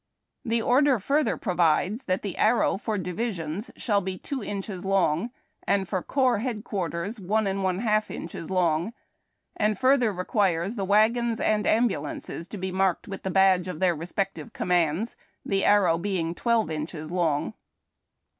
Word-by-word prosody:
The 230 -2 0
order 265 +2 +4
further 280 +9 +1
provides 180 - +1
that 185 0 -1
the 200 -3 -4
arrow 225 +2 +3
for 215 +1 -2
divisions 180 0 -3
shall 205 -4 +1
be 185 0 -4
two 265 +1 -5
inches 195 -2 -5
long, 190 0 +1 0.4
and 195 -2 +2
for 185 -1 -1
corps 260 -2 +1
headquarters 210 -4 -3
one 210 +3 0
and 195 0 -1
one 185 -1 +1
half 215 -2 +1
inches 165 0 -7
long, 175 +1 +1 0.6
and 210 -1 +1
further 255 -2 +3
requires 190 0 0
the 195 -4 -2
wagons 225 +3 +3
and 210 -1 +1
ambulances 180 -6 -1
to 210 - -7
be 190 0 -3
marked 190 +2 0
with 195 -1 -6
the 190 - -3
badge 190 -1 +4
of 180 -4 -5
their 180 -2 +2
respective 195 +7 -4
commands, 175 +4 0 0.3
the 195 -1 0
arrow 185 -5 +4
being 175 -3 -1
twelve 230 -1 +1
inches 155 +1 -5
long. 165 -5 0
195 Hz, 155 wpm, -26 LUFS, 175-220 Hz, 0.6 s, order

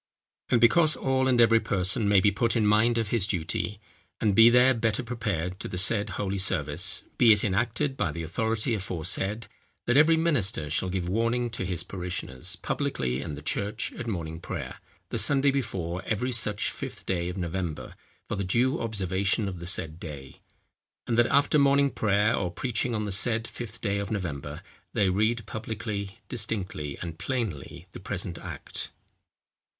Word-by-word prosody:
"And 120 - +4
because 155 +7 +5
all 130 0 +1
and 125 -2 +3
every 115 -1 +6
person 95 +1 0
may 100 -1 +6
be 100 +2 +3
put 115 +4 0
in 110 -2 +2
mind 110 +3 +3
of 115 -3 -1
his 110 -4 +1
duty, 100 +2 -2 0.4
and 105 -3 +2
be 115 +3 +8
there 125 +2 +6
better 115 0 0
prepared 105 -7 -3
to - - -4
the 90 - -5
said 100 +2 +4
holy 100 -1 -2
service, 80 -4 +1 0.2
be 120 -2 +7
it 105 -1 +4
enacted 120 +7 0
by 95 -7 0
the 85 +2 -5
authority 110 - -1
aforesaid, 95 +3 -2 0.4
that 120 +2 +3
every 160 +2 +6
minister 110 - +1
shall 90 +4 0
give 90 -1 -2
warning 115 +4 0
to 95 -5 -3
his 90 -3 -3
parishioners, 90 -9 -4
publicly 65 +1 -2
in 75 - -5
the 75 - -10
church 100 +6 -1
at 120 - -7
morning 80 -6 -4
prayer, - - -6 0.3
the - - -2
Sunday 140 -1 +3
before 95 -10 -3
every 125 +4 -1
such 105 -4 +1
Fifth - - -8
day 90 -2 -1
of 90 - -6
November, 85 -2 -4 0.3
for - - -2
the 100 - -2
due 120 +8 +1
observation 100 -1 0
of 90 -3 -5
the 85 - -6
said 80 -3 0
day. 70 -6 -9 0.6
And 115 - 0
that 120 0 +4
after 145 +2 +3
morning 140 0 +4
prayer 105 +1 +2
or 90 - -1
preaching 120 +4 -1
on 105 -1 -1
the 105 - -3
said 115 +3 +3
Fifth 120 -1 -9
day 100 -2 0
of 100 -1 -4
November, 75 -8 -4 0.3
they 95 -2 +2
read 110 +3 +1
publicly, 110 -1 -5
distinctly, 95 - -3
and 80 -2 -7
plainly, 95 - -4
the - - -9
present 95 -3 -4
Act." - - -6
105 Hz, 175 wpm, -27 LUFS, 90-115 Hz, 0.6 s, be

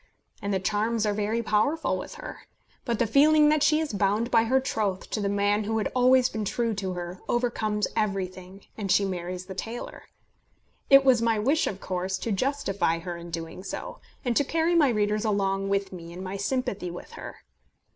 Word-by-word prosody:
And 200 - -2
the 190 - +1
charms 215 +3 0
are 210 - +1
very 215 +3 -1
powerful 215 +9 +1
with - - -6
her. - - -9 0.4
But 235 -3 0
the 235 - +2
feeling 300 +6 +5
that 305 -1 +3
she 305 +1 +4
is 315 -7 -2
bound 205 +4 +1
by 225 0 +4
her 260 +3 +3
troth 210 -7 -2
to 215 - -1
the 200 - 0
man 205 +1 +1
who 225 +1 -1
had 215 - -1
always 255 0 +5
been 220 -3 -4
true 230 +3 -1
to 195 -2 -3
her 175 +1 -6
overcomes 220 -3 0
everything, 190 -2 -3
and 200 -3 -3
she 200 - +4
marries 180 -1 -4
the 190 - -7
tailor. 225 +5 -6 0.8
It 275 0 +8
was 255 -3 +5
my 230 -1 +2
wish 275 +9 +2
of 195 - -4
course 185 0 -2
to 230 - -3
justify 200 - 0
her 175 +1 -5
in 170 0 -9
doing 165 +2 -6
so, 195 - -6 0.3
and 245 -1 +1
to - - +4
carry 325 +4 +1
my 310 -5 +5
readers 210 -2 +1
along 195 -2 0
with 200 -1 -1
me 170 -2 -9
in 180 +2 -7
my 190 +1 -5
sympathy 200 -3 -2
with 175 - -9
her. - - -10
210 Hz, 200 wpm, -27 LUFS, 190-240 Hz, 0.8 s, It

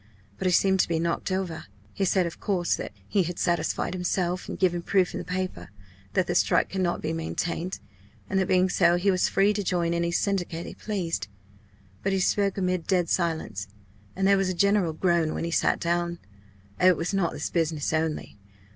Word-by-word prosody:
But - - 0
he - - +3
seemed 190 +1 +3
to - - +3
be 170 - 0
knocked 170 +3 -1
over. 185 -4 -2 0.3
He 195 - 0
said, 185 0 +2
of 170 - -6
course, 185 -4 0
that - - -6 0.2
he 200 - +2
had 175 -1 -3
satisfied 175 +1 0
himself, 180 0 -1
and - - -4
given 175 -2 +1
proof 185 0 +1
in - - -3
the - - -5
paper, 185 - -4 0.4
that - - +2
the - - -1
strike - - +2
could 190 - -1
not 175 -2 -1
be 160 +1 -1
maintained, 170 +2 -3 0.5
and 190 - 0
that 190 - +1
being 185 0 +4
so 175 -1 +3
he 190 +3 +2
was 185 0 +2
free 200 +2 +3
to 205 0 -2
join 170 -2 0
any 170 0 0
syndicate 175 -2 -1
he - - -7
pleased. 170 - -3 0.7
But 195 - 0
he 190 - +1
spoke 200 +1 +1
amid 185 -3 -1
dead 180 -3 +2
silence, 160 - -1 0.5
and 190 - 0
there 200 0 +5
was 195 -1 +1
a 185 - -2
general 200 -2 +2
groan 170 -1 +1
when - - -3
he 170 - -2
sat - - +2
down. 170 0 -1 0.6
Oh, 180 - +5
it 180 -3 +5
was 170 +4 -2
not 190 -4 +1
this 150 - -4
business 160 -3 0
only! 155 -8 -2
180 Hz, 210 wpm, -26 LUFS, 170-190 Hz, 0.7 s, there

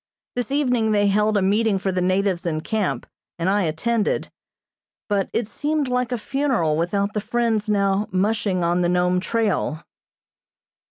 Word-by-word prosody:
This 245 -2 -2
evening 250 -6 +1
they 205 -1 +3
held 210 +1 +2
a 195 - +2
meeting 205 +1 +2
for 190 0 -1
the 185 0 -1
natives 185 0 +1
in 160 -3 -2
camp, 215 +2 -2 0.3
and 170 +1 -1
I 205 +2 +2
attended, 210 +8 -1 0.8
but 200 -2 0
it 230 -2 -1
seemed 295 +4 -1
like 250 0 -1
a 245 - 0
funeral 240 - 0
without 200 +5 0
the 210 - -1
friends 225 -1 0
now 200 0 +1
"mushing" 195 -1 0
on 175 +1 +1
the 175 - +2
Nome 180 0 +2
trail. 195 -6 -1
205 Hz, 160 wpm, -22 LUFS, 185-230 Hz, 0.8 s, they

